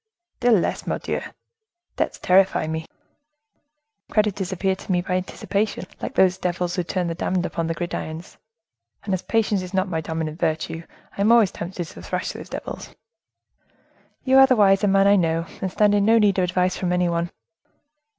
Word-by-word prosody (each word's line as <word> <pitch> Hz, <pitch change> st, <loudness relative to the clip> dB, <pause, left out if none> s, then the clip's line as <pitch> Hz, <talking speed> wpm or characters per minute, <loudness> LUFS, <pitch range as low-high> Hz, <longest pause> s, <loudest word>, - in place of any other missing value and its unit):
"Still 245 Hz, -1 st, +3 dB
less, 180 Hz, -, -1 dB
Mordioux! -, -, -2 dB, 0.7 s
Debts -, -, -1 dB
terrify 185 Hz, -2 st, +3 dB
me. 160 Hz, +1 st, -4 dB, 1.2 s
Creditors 205 Hz, -3 st, 0 dB
appear 190 Hz, +1 st, 0 dB
to 190 Hz, -, -7 dB
me, 180 Hz, -, +2 dB
by 180 Hz, -, -3 dB
anticipation, 190 Hz, +2 st, -2 dB, 0.2 s
like -, -, -5 dB
those 185 Hz, 0 st, +3 dB
devils 175 Hz, -1 st, -2 dB
who 180 Hz, -, 0 dB
turn 180 Hz, +1 st, -2 dB
the 170 Hz, -, -2 dB
damned 180 Hz, +1 st, -1 dB
upon 165 Hz, -1 st, -2 dB
the 165 Hz, -, -2 dB
gridirons, 170 Hz, -1 st, -5 dB, 0.7 s
and 200 Hz, -1 st, -2 dB
as 185 Hz, -, -1 dB
patience 215 Hz, -2 st, 0 dB
is 185 Hz, +1 st, -7 dB
not 190 Hz, +1 st, +1 dB
my 165 Hz, -3 st, -2 dB
dominant 160 Hz, 0 st, -4 dB
virtue, 160 Hz, -1 st, -1 dB, 0.3 s
I -, -, -3 dB
am 210 Hz, +3 st, +4 dB
always 230 Hz, -5 st, +5 dB
tempted 175 Hz, 0 st, -5 dB
to -, -, -12 dB
thrash -, -, -3 dB
those -, -, -10 dB
devils." -, -, -7 dB, 1.3 s
"You 265 Hz, 0 st, +5 dB
are 270 Hz, -, +8 dB
the 260 Hz, -, +4 dB
wisest 195 Hz, -1 st, +4 dB
man 195 Hz, 0 st, +4 dB
I 200 Hz, 0 st, +5 dB
know, 165 Hz, -2 st, +1 dB, 0.2 s
and 190 Hz, -, -2 dB
stand 210 Hz, +1 st, +3 dB
in 205 Hz, -1 st, +3 dB
no 225 Hz, +2 st, +5 dB
need 205 Hz, -3 st, +3 dB
of 185 Hz, -, +3 dB
advice 180 Hz, +1 st, 0 dB
from 180 Hz, -2 st, -2 dB
any 180 Hz, 0 st, +2 dB
one. 170 Hz, 0 st, -1 dB
185 Hz, 180 wpm, -23 LUFS, 170-200 Hz, 1.3 s, are